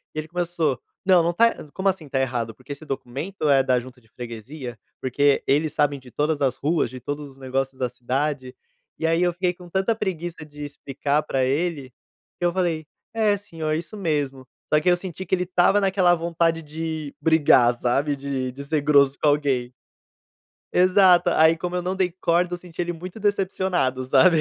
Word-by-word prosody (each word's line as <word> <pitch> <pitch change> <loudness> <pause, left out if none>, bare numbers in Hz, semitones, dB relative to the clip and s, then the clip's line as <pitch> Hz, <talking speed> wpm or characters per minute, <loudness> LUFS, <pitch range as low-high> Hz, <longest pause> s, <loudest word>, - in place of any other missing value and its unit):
E - - -1
ele 155 - -5
começou: 170 -6 -1 0.3
"Não, 185 -2 +6
não 170 +1 +1
está 230 +7 +3 0.2
como 195 +1 +1
assim 185 -4 -3
está 135 -2 -2
errado? 120 -3 -2
Porque - - -13
esse 145 +2 -7
documento 145 +5 -3
é 135 -1 +6
da 130 -1 +2
junta 125 +1 -13
de 115 - -27
freguesia". 120 +2 -8 0.2
Porque 140 +2 +2
eles 150 +3 +1
sabem 145 -1 +1
de 130 -1 -15
todas 150 +4 -1
as 130 -2 +2
ruas, 160 +3 0
de 130 - -9
todos 145 +1 -5
os 135 - -20
negócios 135 0 -2
da 125 -1 -1
cidade, 130 +2 -3 0.4
e - - -3
aí 165 +1 +2
eu 175 -1 +2
fiquei 180 0 0
com 180 0 -14
tanta 190 +5 +1
preguiça 175 -6 -4
de 150 -1 -10
explicar 145 0 -2
pra 135 -3 0
ele, 140 +1 -1 0.5
que 175 - 0
eu 175 - +2
falei: 170 -4 -1 0.3
"É, 215 -2 +2
senhor, 165 -6 -4
isso 170 +6 -5
mesmo". 145 -7 -2 0.3
Só 150 - +6
que 180 - +2
aí - - +6
eu - - +1
senti 185 0 -6
que 190 - +1
ele 180 - -1
estava 180 +2 +3
naquela 190 -2 +3
vontade 165 -1 0
de 155 -1 -5
brigar, 145 -7 +5
sabe, 135 +5 0
de 135 -2 -3
de 140 +3 -8
ser 150 +1 0
grosso 140 -2 +4
com - - +2
alguém. 140 -4 +1 1.0
Exato. 180 -1 +5
Aí, 160 0 +5
como 180 +2 -4
eu 180 - 0
não 180 +2 -2
dei 185 -2 +1
corda, 175 0 +1
eu - - -2
senti 175 -1 -7
ele 175 0 -2
muito 180 +5 -9
decepcionado, 190 -9 0
sabe. 135 +6 +5
155 Hz, 200 wpm, -23 LUFS, 135-175 Hz, 1.0 s, Não